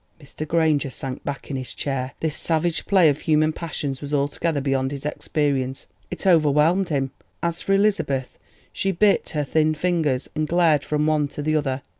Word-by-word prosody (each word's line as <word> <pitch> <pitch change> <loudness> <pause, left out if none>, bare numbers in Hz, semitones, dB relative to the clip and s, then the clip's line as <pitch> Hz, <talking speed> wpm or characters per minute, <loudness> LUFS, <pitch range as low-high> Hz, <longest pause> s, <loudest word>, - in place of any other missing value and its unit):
Mr. 155 +1 -8
Granger 155 -3 +2
sank 130 0 -5
back 140 0 -5
in - - -2
his 130 -1 -5
chair; 135 -2 -3
this 160 -2 -1
savage 165 0 0
play 190 -5 +5
of 145 -1 +2
human 155 0 +2
passions 150 -5 -4
was 145 0 -2
altogether 145 +2 0
beyond 135 -1 0
his 140 0 -7
experience—it 135 - -3
overwhelmed 165 +2 +4
him. 135 -3 -1 0.3
As 170 0 -1
for 195 - 0
Elizabeth, 195 -11 0 0.3
she 195 - 0
bit 200 +3 +2
her 150 - +1
thin 155 +2 +1
fingers, 155 -6 0
and 155 0 -1
glared 165 -3 +3
from 150 0 0
one 155 -2 +2
to 145 +1 -6
the 155 +1 +1
other. 135 -3 -1
150 Hz, 175 wpm, -23 LUFS, 140-165 Hz, 0.3 s, play